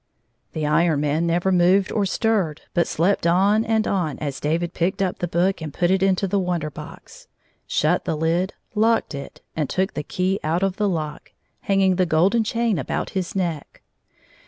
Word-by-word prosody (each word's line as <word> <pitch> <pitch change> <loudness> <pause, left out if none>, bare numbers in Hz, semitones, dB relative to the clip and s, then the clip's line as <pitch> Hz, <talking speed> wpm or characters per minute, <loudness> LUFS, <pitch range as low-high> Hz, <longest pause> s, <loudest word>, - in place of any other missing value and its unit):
The 155 -1 -2
Iron 155 0 +2
Man 150 +3 0
never 175 +3 +1
moved 185 +2 +3
or 205 -3 0
stirred, 195 -8 0
but 170 - +2
slept 170 +1 +1
on 200 +5 +3
and 220 -1 +1
on 175 -7 -1
as 140 -3 -4
David 165 +3 -1
picked 175 +2 -1
up 190 -2 -1
the 175 - -1
book 175 +2 0
and 155 -2 -5
put 175 +4 +1
it 190 0 +2
into 195 0 +2
the 200 +2 +1
Wonder 175 -5 -2
Box, 330 - -12 0.4
shut - - +1
the - - -1
lid, 165 +4 0 0.2
locked 225 -3 +2
it, 140 0 -8
and 150 -4 -1
took 190 +1 -1
the 150 - -3
key 185 +5 -1
out 165 +4 0
of 195 -1 0
the 210 -1 +1
lock, 155 -4 -4 0.3
hanging 195 -2 +2
the 185 -1 +2
golden 185 +9 +3
chain 230 -3 0
about - - -3
his 185 -1 -3
neck. 170 -6 -3
180 Hz, 185 wpm, -22 LUFS, 160-195 Hz, 0.4 s, moved